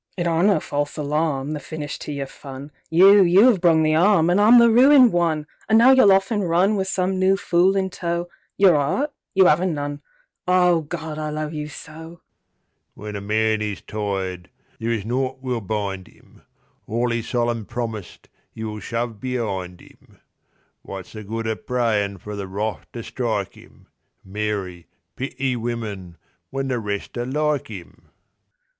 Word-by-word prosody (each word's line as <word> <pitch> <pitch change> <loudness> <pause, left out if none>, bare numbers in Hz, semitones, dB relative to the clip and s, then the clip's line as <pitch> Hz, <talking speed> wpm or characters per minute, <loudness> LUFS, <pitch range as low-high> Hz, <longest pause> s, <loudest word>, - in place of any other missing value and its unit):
It 175 - -1
aren't 170 +3 +2
no 205 - +3
false 145 0 -3
alarm, 150 -1 -1
The 150 - -4
finish 150 +1 -6
to - - -6
your 140 -1 -3
fun; 135 +1 -10 0.2
You—you 190 +4 +6
'ave 230 -7 +4
brung 165 -2 +4
the 155 0 +2
'arm, 175 0 +4
An' 180 - +3
I'm 220 +4 +7
the 235 -1 +6
ruined 255 +1 +7
one; 165 -3 +1 0.2
An' 220 - +5
now 240 +3 +7
you'll 260 -7 +6
off 195 +3 +3
an' 215 - +1
runWith 190 +3 +1
some 185 0 -1
new 190 +1 +3
fool 185 0 +2
in 190 -1 0
tow. 170 -1 -3 0.3
Your 195 -3 +6
'eart? 155 - 0 0.2
You 190 -1 +6
'aven't 170 +2 +2
none….Ah, 180 - -1
Gawd, 155 0 -6
I 155 0 -3
love 155 +1 -4
you 150 -1 -4
so! 160 +3 -11 0.8
When 105 0 -8
a 100 - -5
man 110 +1 0
is 105 -2 -4
tired 95 -4 -4 0.3
there 115 - -3
is 110 -4 -2
naught 130 +3 -2
will 125 -3 -3
bind 100 -2 -4
'im; - - -23 0.5
All 120 +2 -1
'e 115 - -1
solemn 120 -1 -2
promised 110 -6 -6 0.3
'e 110 - -5
will 105 -1 -5
shove 115 -1 -4
be'ind 100 -8 -4
'im. - - -21 0.6
What's 95 -2 -9
the 110 -1 -8
good 115 +2 -4
o' 110 - 0
prayin' 110 -5 -1
for 105 +3 -8
The 100 -1 -5
Wrath 105 +2 -4
to - - -6
strike - - -3
'im(Mary, 95 -3 -7 0.3
pity 130 0 -2
women!), 110 -7 -5 0.3
when 135 0 -3
the 125 -2 -1
rest 105 +2 -5
are 120 - -2
like 150 0 -1
'im? 95 -6 -11
140 Hz, 165 wpm, -22 LUFS, 110-175 Hz, 0.8 s, I'm